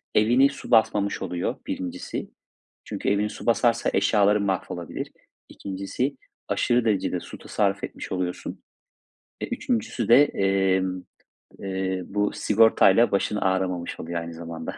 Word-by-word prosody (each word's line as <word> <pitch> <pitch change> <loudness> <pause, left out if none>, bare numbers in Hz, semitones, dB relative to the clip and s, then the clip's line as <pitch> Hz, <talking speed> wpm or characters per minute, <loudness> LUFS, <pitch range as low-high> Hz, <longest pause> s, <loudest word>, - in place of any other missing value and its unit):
evini 120 +6 +5
su 140 - -10
basmamış 105 -3 +3
oluyor, 90 -2 -2
birincisi. 90 -1 -5 0.6
Çünkü - - -3
evini 100 +1 +1
su - - -9
basarsa 115 0 +2
eşyaların 100 +1 +3
mahvolabilir. 95 -2 -3 0.4
İkincisi, 100 +8 -4 0.3
aşırı 120 -1 +1
derecede 95 -4 0
su - - -10
tasarruf - - -1
etmiş - - -6
oluyorsun. 90 -1 -4 0.8
E, - - -2
üçüncüsü 115 -3 -2
de, 130 +5 +8
emm, 95 -5 0 0.6
eee, 95 -1 -2
bu 105 +1 0
sigortayla 110 0 +4
başın 100 +1 0
ağrımamış 95 -3 -1
oluyor 85 +1 -3
aynı 85 0 -7
zamanda. 80 0 -7
100 Hz, 120 wpm, -25 LUFS, 95-110 Hz, 0.8 s, de